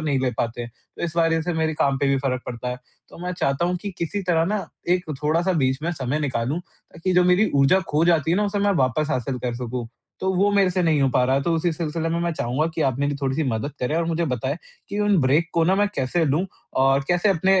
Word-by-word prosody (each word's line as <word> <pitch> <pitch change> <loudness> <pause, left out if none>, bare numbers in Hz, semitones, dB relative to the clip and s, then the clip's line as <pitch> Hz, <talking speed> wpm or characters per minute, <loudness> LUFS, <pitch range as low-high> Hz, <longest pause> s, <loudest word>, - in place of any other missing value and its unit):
नहीं 145 -4 0
ले 130 -1 +1
पाते 120 +1 -2
हैं, 120 - -7 0.3
तो - - -7
इस 170 -1 -5
वजह 165 -1 +3
से 175 +2 -2
मेरे 160 0 0
काम 140 -2 +1
पे 140 - +1
भी 135 - +3
फ़र्क 130 -1 -2
पड़ता 125 0 -5
है। 125 - -3 0.3
तो - - -14
मैं 180 - -2
चाहता 140 -3 0
हूँ 180 +1 0
कि 205 - -3
किसी 195 +5 -2
तरह 170 -3 +2
ना 195 0 -2 0.2
एक 180 0 +2 0.2
थोड़ा-सा 165 +5 +2
बीच 130 -5 +1
में 170 - 0
समय 140 -1 -2
निकालूँ, 135 +1 -1
ताकि 180 +1 -6
जो 180 0 +5
मेरी 180 +4 +3
ऊर्जा 140 +7 +4
खो 150 +2 +2
जाती 165 -3 +3
है 175 - +3
ना 210 - +2
उसे 205 0 -1
मैं 200 0 +2
वापस 135 +5 0
हासिल 130 -1 -1
कर 120 -1 -3
सकूँ। 120 0 -4 0.3
तो 190 0 0
वो 200 +3 +3
मेरे 195 -2 +4
से 180 0 0
नहीं 160 -4 +2
हो 135 - +4
पा 125 - +4
रहा 130 +1 +2
है, 140 - +1
तो 170 - 0
उसी 165 +1 +1
सिलसिले 165 0 -2
में 165 +1 -1
मैं 170 0 0
चाहूँगा 140 +1 -1
कि 160 - 0
आप 130 -3 0
मेरी 145 0 0
थोड़ी-सी 135 +3 0
मदद 125 +5 -2
करें 145 +6 0
और 170 - +1
मुझे 170 0 0
बताएँ, 130 +1 -2 0.3
कि 200 - -4
उन 205 -3 +3
ब्रेक 145 +6 +2
को 165 - +2
ना 185 +3 +3
मैं 205 +1 +2
कैसे 140 +6 0
लूँ 155 +6 +1 0.4
और 135 +1 +3
कैसे 175 +3 +2
अपने 190 +1 +3
160 Hz, 265 wpm, -23 LUFS, 135-175 Hz, 0.4 s, जो